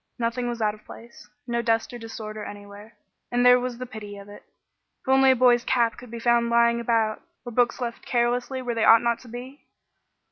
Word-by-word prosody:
Nothing 240 Hz, +1 st, -2 dB
was 235 Hz, -2 st, -3 dB
out 210 Hz, -1 st, +1 dB
of 215 Hz, -, -16 dB
place. 230 Hz, -2 st, -14 dB, 0.2 s
No 235 Hz, -1 st, -1 dB
dust 225 Hz, 0 st, 0 dB
or 240 Hz, -, -7 dB
disorder 215 Hz, -2 st, -7 dB
anywhere, 205 Hz, +2 st, -11 dB, 0.4 s
and 245 Hz, 0 st, +1 dB
there 250 Hz, 0 st, +7 dB
was 245 Hz, -1 st, -4 dB
the 255 Hz, -, -6 dB
pity 210 Hz, -4 st, -9 dB
of 200 Hz, 0 st, -12 dB
it. 205 Hz, -, -12 dB, 0.6 s
If -, -, -27 dB
only 265 Hz, 0 st, +5 dB
a 260 Hz, -, +5 dB
boy's 245 Hz, -1 st, +4 dB
cap 235 Hz, -3 st, +1 dB
could 245 Hz, -, -12 dB
be 235 Hz, -, -7 dB
found 235 Hz, 0 st, +2 dB
lying 235 Hz, 0 st, +3 dB
about, 225 Hz, -2 st, 0 dB, 0.2 s
or 240 Hz, -, -6 dB
books 245 Hz, +2 st, +1 dB
left 235 Hz, -2 st, -5 dB
carelessly 245 Hz, +2 st, -1 dB
where 245 Hz, -1 st, -2 dB
they 225 Hz, -1 st, -1 dB
ought 225 Hz, +2 st, +6 dB
not 235 Hz, -1 st, 0 dB
to 255 Hz, -, -16 dB
be! 250 Hz, +4 st, -10 dB
235 Hz, 215 wpm, -25 LUFS, 225-245 Hz, 0.6 s, there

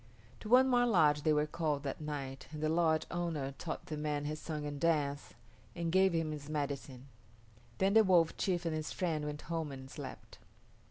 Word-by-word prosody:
To 210 Hz, -, -8 dB
one 255 Hz, +2 st, +7 dB
more 245 Hz, -1 st, +4 dB
lodge 155 Hz, -9 st, +4 dB
they 155 Hz, -, +2 dB
were 150 Hz, 0 st, +3 dB
called 150 Hz, -2 st, -2 dB
that 140 Hz, +2 st, -4 dB
night 140 Hz, -3 st, -5 dB
and 155 Hz, -1 st, -6 dB
the 155 Hz, -, +2 dB
lodge 160 Hz, -1 st, +2 dB
owner 165 Hz, -6 st, -2 dB
taught 165 Hz, -, -5 dB
the 155 Hz, -, -5 dB
man 150 Hz, -1 st, -2 dB
his 155 Hz, +1 st, -3 dB
song 150 Hz, -2 st, -4 dB
and 145 Hz, -1 st, -5 dB
dance, 145 Hz, -4 st, 0 dB, 0.4 s
and 170 Hz, -1 st, -2 dB
gave 190 Hz, +1 st, +5 dB
him 165 Hz, -2 st, 0 dB
his 150 Hz, -1 st, -7 dB
medicine. 140 Hz, -3 st, -4 dB, 0.7 s
Then 195 Hz, +1 st, +2 dB
the 220 Hz, 0 st, +7 dB
Wolf 175 Hz, -4 st, +4 dB
chief 175 Hz, -2 st, -1 dB
and 165 Hz, -, 0 dB
his 155 Hz, 0 st, -3 dB
friend 160 Hz, -5 st, -1 dB
went 150 Hz, 0 st, -5 dB
home 165 Hz, -3 st, -3 dB
and 130 Hz, -1 st, -8 dB
slept. -, -, -9 dB
155 Hz, 200 wpm, -34 LUFS, 145-170 Hz, 0.7 s, one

